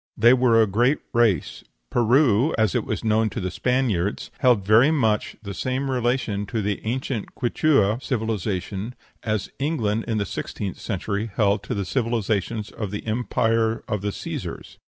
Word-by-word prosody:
They 120 +3 +6
were 125 -3 +4
a 110 - +6
great 120 +8 +2 0.2
race. 115 -5 +1 0.3
Peru, 120 +2 +3
as 110 -1 +2
it 120 -4 0
was - - -3
known 110 0 +2
to 115 - -5
the 95 -3 -3
Spaniards, 115 -6 0
held 120 -8 +3
very 110 +7 +6
much 115 -9 +1
the 100 -1 -5
same 130 +7 -2
relation 120 -5 -1
to 110 +1 -2
the 100 0 -2
ancient 120 -1 -3
Quichua 120 -3 +2
civilization 110 -2 -3 0.3
as 110 -3 -2
England 115 -8 0
in 115 -2 0
the 100 - 0
sixteenth 100 -1 -5
century 105 +1 -3
held 105 -1 +2
to - - -4
the 100 -1 -2
civilization 110 0 -1
of 105 -3 -4
the 105 +1 -6
empire 115 0 0
of 105 -3 -2
the 105 - -1
Cæsars. 100 - -6
110 Hz, 160 wpm, -24 LUFS, 105-125 Hz, 0.3 s, They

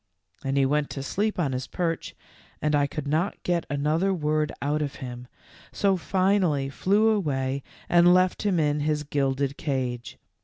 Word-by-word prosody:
Then 135 0 -2
he 140 -1 +4
went 145 +1 +1
to 135 - -5
sleep 210 +9 -1
on 155 -7 0
his 130 0 -3
perch 165 -3 -3 0.4
and 150 0 0
I 145 -1 +3
could 145 0 -5
not 160 +7 0
get 175 -1 0
another 155 +7 +1
word 155 -3 0
out 150 +2 0
of 145 -2 -3
him, 125 -2 -7 0.4
so 195 -1 +2
finally 185 -6 +1
flew 205 +9 +2
away 140 -10 0 0.3
and 175 0 +6
left 185 0 +3
him 200 -5 +1
in 150 -1 +1
his 150 0 0
gilded 140 -1 -1
cage. 125 -4 -3
150 Hz, 165 wpm, -26 LUFS, 140-180 Hz, 0.4 s, and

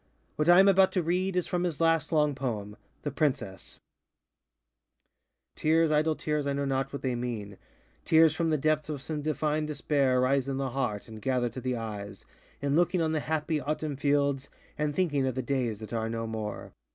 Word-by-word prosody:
What 155 +2 +1
I 175 +1 +8
am 195 - +7
about 190 -1 +5
to 180 - +1
read 180 +3 0
is 180 - +1
from 180 -1 -1
his 170 -5 -2
last 165 -2 +2
long 150 -2 +3
poem, 110 -7 -4 0.3
ŌĆ£The 145 - -1
PrincessŌĆØ:ŌĆö 140 - -2 1.8
Tears, 160 0 +3
idle 155 +1 +2
tears, 150 -2 -2
I 140 - 0
know 140 0 -1
not 135 0 -1
what 140 - -6
they 130 -2 0
mean, 115 -5 -4 0.4
Tears 160 -1 +5
from 165 0 0
the 155 - +2
depth 155 +1 0
of 145 -3 -4
some 155 -1 -3
divine 155 +1 -1
despair 140 -3 +1
Rise 135 +1 +2
in 135 -1 -2
the 135 -2 -2
heart, 120 -6 -2
and 110 -1 -10
gather 125 -1 0
to 125 +3 -7
the 125 0 -1
eyes, 105 -3 -7 0.4
In 140 0 +1
looking 175 +2 +2
on 160 -1 +1
the 160 - 0
happy 155 0 -1
Autumn 150 +1 -2
fields, 140 -1 +1 0.3
And 150 -1 -1
thinking 145 -8 +1
of 130 - -2
the 130 - -2
days 120 -4 -1
that 110 +1 -9
are 115 -1 -1
no 115 0 -3
more. 110 -2 -5
140 Hz, 200 wpm, -29 LUFS, 125-155 Hz, 1.8 s, I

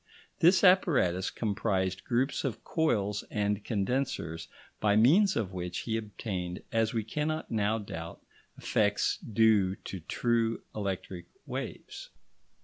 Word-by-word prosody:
This 180 +5 +5
apparatus 140 - +4
comprised 95 -4 -1
groups 130 +3 0
of 125 -5 -3
coils 105 - 0
and 105 0 -1
condensers 100 -7 -2 0.3
by 105 -1 +3
means 175 - +5
of 100 -5 -2
which 90 -1 -4
he 110 - -2
obtained, 100 -5 -4
as 115 -1 +1
we 115 -2 -1
cannot 150 +7 -3
now 110 0 +1
doubt, 85 -6 -7 0.4
effects 105 -1 +1
due 110 -4 +3
to 95 - -8
true 115 +6 0
electric 95 -3 -4 0.2
waves. - - -6
105 Hz, 120 wpm, -30 LUFS, 95-120 Hz, 0.4 s, This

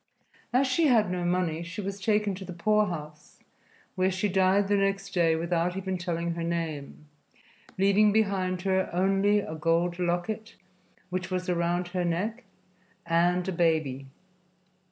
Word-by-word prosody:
As 255 +3 +3
she 285 +5 +2
had 220 -8 +3
no 180 -1 -2
money, 175 -2 0
she 170 +3 -7
was 200 0 -5
taken 210 0 +1
to 190 +1 -7
the 185 - -7
poorhouse, 170 -5 -1 0.6
where 185 0 +1
she 190 +2 -1
died 190 +1 +3
the 205 - +2
next 195 0 0
day 170 -3 +2
without 170 +2 -1
even 190 -1 -2
telling 170 -2 -2
her 170 - -5
name, 160 -4 -4 0.7
leaving 200 +2 +4
behind 190 -4 0
her 190 -1 +1
only 195 +3 +2
a 160 - -6
gold 165 +2 0
locket, 180 +6 -2 0.6
which 180 -1 -3
was 185 0 -2
around 175 0 0
her 180 0 -1
neck, 205 +8 -2 0.6
and 175 +2 +2
a - - 0
baby. 155 -6 0
180 Hz, 150 wpm, -27 LUFS, 170-195 Hz, 0.7 s, leaving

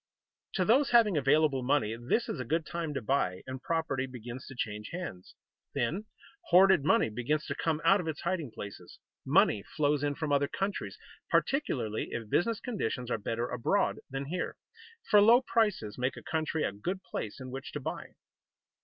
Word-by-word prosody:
To 185 - +1
those 265 +7 +4
having 225 -6 +5
available 145 -1 +3
money 125 -4 +1
this 120 - 0
is - - -4
a - - -2
good 160 +6 -1
time 170 -2 -3
to 140 - -3
buy, 100 -8 0
and 130 0 -6
property 150 -5 -1
begins 125 0 -8
to 130 - -9
change 105 -3 -4
hands. 165 - -7 0.4
Then 145 - -1 0.4
hoarded 185 -2 +6
money 140 - +3
begins 135 +7 -1
to - - -3
come 160 -2 -1
out 195 +3 +6
of 165 - -7
its 155 -3 -3
hiding 170 -5 -1
places. 100 -5 -9 0.3
Money 155 - +4
flows 145 +4 0
in 145 -1 0
from 155 -1 -3
other 140 0 +3
countries, 195 +5 -3 0.3
particularly 130 - 0
if 115 -3 -5
business 220 +6 +2
conditions 125 - -3
are - - 0
better 115 +3 -2
abroad 125 -2 +1
than 135 +1 -4
here, 175 +5 -3 0.5
for 210 - +6
low 230 +4 +7
prices 215 - 0
make 130 +1 -1
a - - -9
country 160 0 -1
a - - 0
good 180 - -4
place 105 - -5
in 130 -1 -7
which 135 +1 -6
to 150 - -3
buy. 130 - -6
145 Hz, 180 wpm, -30 LUFS, 125-180 Hz, 0.5 s, low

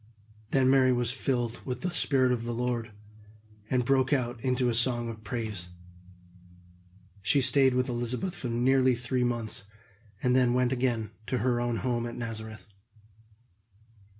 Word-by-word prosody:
Then 135 -1 +3
Mary 130 -1 +5
was 120 -1 +2
filled 120 -3 -2
with 125 -2 -5
the 180 - -2
Spirit 135 -5 +2
of 120 -2 -1
the 120 0 -3
Lord, 120 -1 -2 0.8
and 125 -2 +1
broke 135 +1 +2
out 120 -4 -1
into 125 -1 +1
a 120 - +1
song 120 0 +1
of 110 -1 -9
praise. 110 -6 -4 1.5
She 140 - +3
stayed 130 0 +5
with 125 0 +1
Elizabeth 125 +8 -2
for 125 - -5
nearly 130 +2 +3
three 125 +1 -1
months, 120 -4 -2 0.6
and 125 0 +3
then 125 -1 +3
went 125 0 +2
again 120 -4 -1 0.2
to 130 - -1
her 120 -1 0
own 120 -1 -1
home 120 0 -1
at 120 - -7
Nazareth. 110 -4 -6
125 Hz, 150 wpm, -28 LUFS, 120-130 Hz, 1.5 s, Mary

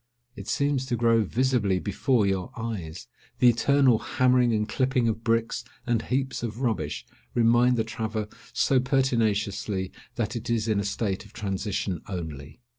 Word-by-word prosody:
It - - -9
seems 140 -2 0
to 125 - 0
grow 115 -1 +3
visibly 115 -3 +1
before 105 +4 +1
your 95 -2 -1
eyes; 95 -8 -5 0.3
the 125 - +6
eternal 130 0 +4
hammering 125 -1 +3
and 105 -1 0
clipping 130 +1 +1
of 115 0 -2
bricks, 115 +1 0 0.2
and 120 -2 +1
heaps 135 +1 -2
of 120 +1 -4
rubbish, 100 - -1 0.3
remind 120 +1 +4
the 110 - +2
traveller 110 -1 -3 0.2
so 135 - +3
pertinaciously 110 -7 0 0.2
that 115 -1 -2
it 115 0 -5
is 115 -1 0
in 110 -2 +2
a - - -1
state 100 -1 -2
of - - -17
transition 95 -3 -3
only. 80 - -6
115 Hz, 155 wpm, -26 LUFS, 100-125 Hz, 0.3 s, the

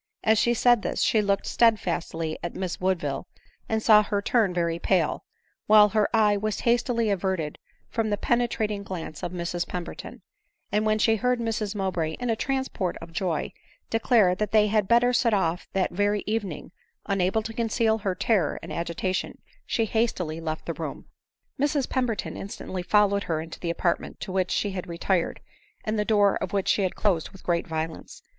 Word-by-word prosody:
As 220 -1 +4
she 240 0 +3
said 240 -1 +4
this, - - -1
she 220 - +3
looked 200 -1 0
steadfastly 170 -8 +1
at 175 - -5
Miss 185 -2 -4
Woodville, 175 -7 -1 0.4
and 220 -1 0
saw 215 -2 +7
her 205 -1 -1
turn 210 -1 +2
very 170 -1 -1
pale, 175 -3 +1 0.4
while 210 -1 +7
her 210 +1 +2
eye 215 -2 +4
was 215 0 -2
hastily 235 -2 +1
averted 185 -5 -2 0.3
from 225 -2 -1
the 205 - 0
penetrating 220 -3 0
glance 170 -6 -6
of - - -3
Mrs 175 -1 -3
Pemberton; 175 -1 -7 0.5
and 210 +1 +1
when 215 0 +3
she 220 +1 +3
heard 250 +2 +1
Mrs 220 -2 -2
Mowbray, 180 -5 -1
in 245 +4 -2
a - - +1
transport 265 -8 -2
of 165 0 -11
joy, 170 -3 -2 0.4
declare 225 -4 +4
that 210 +2 -2
they 215 -1 +5
had 210 -2 +2
better 240 +2 +4
set 235 -2 +3
off 175 -3 -1
that 190 -1 +1
very 205 +2 0
evening, 205 -8 -3 0.3
unable 195 +2 +1
to 225 +1 -6
conceal 225 -1 +1
her 195 -3 -2
terror 185 -5 +1
and - - -7
agita 170 +2 -2
tion, - - -3 0.3
she 225 - +1
hastily 185 -8 -1
left 160 -1 -4
the - - -2
room. - - -6 0.5
Mrs 285 -1 +1
Pemberton 250 -5 -2
instantly 190 -2 -6
followed 200 +2 +3
her 160 -2 -1
into 160 +1 -8
the 170 - -3
apart 170 +1 +1
ment - - -10
to 195 - -5
which 185 -1 0
she 205 - 0
had 185 -1 -5
retired, 170 +1 -1 0.4
and 215 0 -1
the 210 - +1
door 205 -2 +3
of 185 - -5
which 195 -2 0
she - - +3
had 185 -2 -1
closed 180 -7 +1
with 190 - -15
great 170 -1 0
violence. 160 0 -5
200 Hz, 185 wpm, -26 LUFS, 175-220 Hz, 0.5 s, saw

